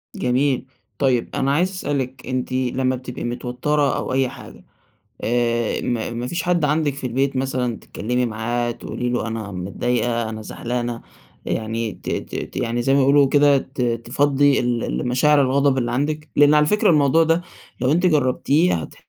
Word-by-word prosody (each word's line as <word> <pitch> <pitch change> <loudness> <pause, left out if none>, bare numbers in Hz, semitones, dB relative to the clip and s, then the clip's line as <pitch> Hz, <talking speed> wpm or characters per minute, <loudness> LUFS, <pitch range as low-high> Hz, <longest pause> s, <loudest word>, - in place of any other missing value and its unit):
جميل، 130 +2 +1 0.3
طيب 130 -4 +1
أنا 135 +1 +1
عايز 175 +5 +2
أسألِك، 135 -8 -4
أنتِ 130 0 -2
لما 130 0 0
بتبقي 125 0 -7
متوترة 125 +4 -1
أو - - -3
أي 130 -1 +2
حاجة، - - -12 0.6
آآ، 120 -1 0
ما 120 -2 -2
ما 120 +1 -4
فيش 170 +5 -2
حد 175 -3 +1
عندِك 150 -1 +1
في 140 -2 -5
البيت 135 +3 0
مثلًا 130 -3 -1
تتكلمي 125 +3 -2
معاه، 120 +2 -2
تقولي 120 +1 -4
له 120 -2 -1
أنا 110 -3 -5
متضايقة، 115 +5 -1
أنا 110 0 -6
زعلانة، 120 +1 -4 0.4
يعني 110 0 -2
ت 90 - -8
ت - - -4 0.2
ت - - -9
يعني 120 +1 -1
زي 135 - +2
ما - - +4
بيقولوا 140 +1 +5
كده 145 0 +5
ت 135 0 -8
تفضّي 135 +4 +2
ال 120 -1 -1
ال - - -2
مشاعر 145 +4 +4
الغضب 140 0 +2
اللي 120 -1 -1
عندِك؟ 150 +4 -2
لأن 145 +1 +6
على 150 0 +4
فكرة 210 +4 +3
الموضوع 150 0 +4
ده 165 +2 +2 0.4
لو 130 +3 +2
أنتِ 175 +3 +2
جربتيه 150 +2 +2
هت 80 -3 -5
130 Hz, 175 wpm, -21 LUFS, 120-145 Hz, 0.6 s, لأن